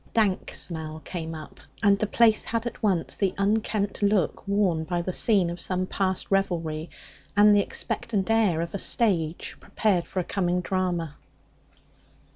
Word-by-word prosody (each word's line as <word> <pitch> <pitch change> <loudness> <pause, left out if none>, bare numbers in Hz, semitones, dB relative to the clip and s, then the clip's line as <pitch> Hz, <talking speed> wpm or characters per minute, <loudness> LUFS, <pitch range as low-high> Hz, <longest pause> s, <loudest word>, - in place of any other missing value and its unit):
A - - -27
dank 210 -5 +1
smell 160 -2 -3
came 165 -2 -5
up, 155 -2 -10 0.2
and 200 0 +4
the 215 - 0
place 220 0 +4
had 230 0 -2
at 240 - -6
once 190 -6 0
the 195 -2 0
unkempt 205 0 0
look 200 -2 +1
worn 195 -5 +1
by 175 +1 -2
the 185 - -3
scene 195 -6 +3
of 175 0 -5
some 185 0 -1
past 190 0 -2
revelry 165 -5 -1 0.5
and 210 0 +7
the 205 - +5
expectant 225 0 -1
air 210 -8 +3
of 170 - -5
a 200 - -3
stage 175 -10 0
prepared 195 -6 0
for 190 - -3
a - - 0
coming 180 -1 -1
drama. 175 -5 -2
190 Hz, 165 wpm, -26 LUFS, 170-205 Hz, 0.5 s, and